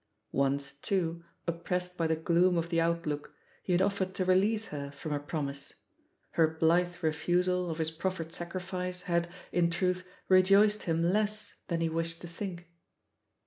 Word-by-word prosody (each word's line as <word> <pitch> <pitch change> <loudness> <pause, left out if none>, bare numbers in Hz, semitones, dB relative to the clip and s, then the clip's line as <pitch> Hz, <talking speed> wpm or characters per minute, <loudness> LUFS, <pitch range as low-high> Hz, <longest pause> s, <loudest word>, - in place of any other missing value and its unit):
Once, 140 0 0
too, 170 +2 -1 0.2
oppressed 180 +1 -2
by 165 -2 +1
the 160 - +2
gloom 175 +2 +3
of 170 0 -1
the 165 -1 +2
outlook, 165 -3 -1 0.3
he - - -3
had 180 +1 +4
offered 195 -1 0
to 185 - 0
release 205 +4 +3
her 140 -1 -4
from 145 +2 -7
her 145 - 0
promise; 140 -2 -4 0.6
her 165 -1 +4
blithe 170 +3 +2
refusal 180 +3 +1
of 160 - -3
his 160 -1 0
proffered 165 0 -3
sacrifice 180 +1 -4
had, 170 -1 0 0.2
in 170 -1 +3
truth, 180 +2 0 0.2
rejoiced 195 +3 +5
him 165 -1 +1
less 210 +4 0
than 170 -1 -1
he 165 - +2
wished 165 +1 -2
to 175 - -8
think. 175 0 -6
170 Hz, 160 wpm, -31 LUFS, 160-185 Hz, 0.6 s, rejoiced